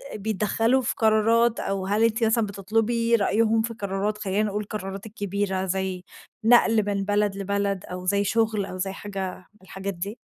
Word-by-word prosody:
بيدخّلوا 220 +4 +1
في 235 - -1
قرارات 225 +1 +3
أو 195 -1 -2
هل 210 +3 +2
أنتِ 230 +1 +2
مثلًا 225 0 +3
بتطلُبي 225 +4 +1
رأيهم 220 +1 +2
في 230 +1 -3
قرارات، 205 0 -2
خلّينا 205 0 0
نقول 210 0 -2
القرارات 195 -1 -6
الكبيرة 200 -2 -2
زي 190 -1 -2 0.4
نقل 225 -3 +5
من 200 -1 0
بلد 205 -1 +1
لبلد 200 -1 -1
أو 180 0 -7
زي 200 +2 +2
شُغل 220 -1 +1
أو 185 - -7
زي 190 +1 -2
حاجة 195 -2 -5 0.2
من 210 - -27
الحاجات 195 +1 -5
دي؟ 200 +6 -6
205 Hz, 170 wpm, -25 LUFS, 195-220 Hz, 0.4 s, نقل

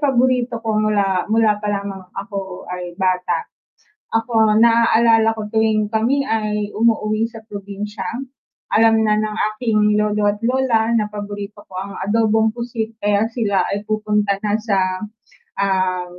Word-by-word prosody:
paborito 250 -3 +2
ko 215 -1 +1
mula 200 -3 +1
mula 215 -1 +2
pa 210 - -4
lang 200 -1 -2
nung 185 -1 -12
ako 195 -2 -6
ay 180 -1 -6
bata. 185 -2 0 0.7
Ako, 225 -2 +3
naaalala 230 -1 +4
ko 215 - -5
tuwing 220 -1 +1
kami 245 +6 +1
ay 210 -3 -1
umuuwi 220 0 +1
sa 225 -1 -12
probinsya, 205 0 -7 0.7
alam 225 0 +5
na 210 0 +3
ng 215 0 -2 0.2
aking 215 -3 +2
lolo 210 -1 +2
at 205 - -8
lola 235 -3 +2
na 210 -2 +1
paborito 205 0 -7
ko 185 - -18
ang 195 +1 -6
adobong 220 +1 +2
pusit 230 -2 -4
kaya 205 +1 +2
sila 210 -5 +1
ay 205 +1 -2
pupunta 210 -2 +1
na 210 0 +1
sa, 205 -3 0 0.8
ah, 185 -2 +1
215 Hz, 145 wpm, -20 LUFS, 205-225 Hz, 0.8 s, alam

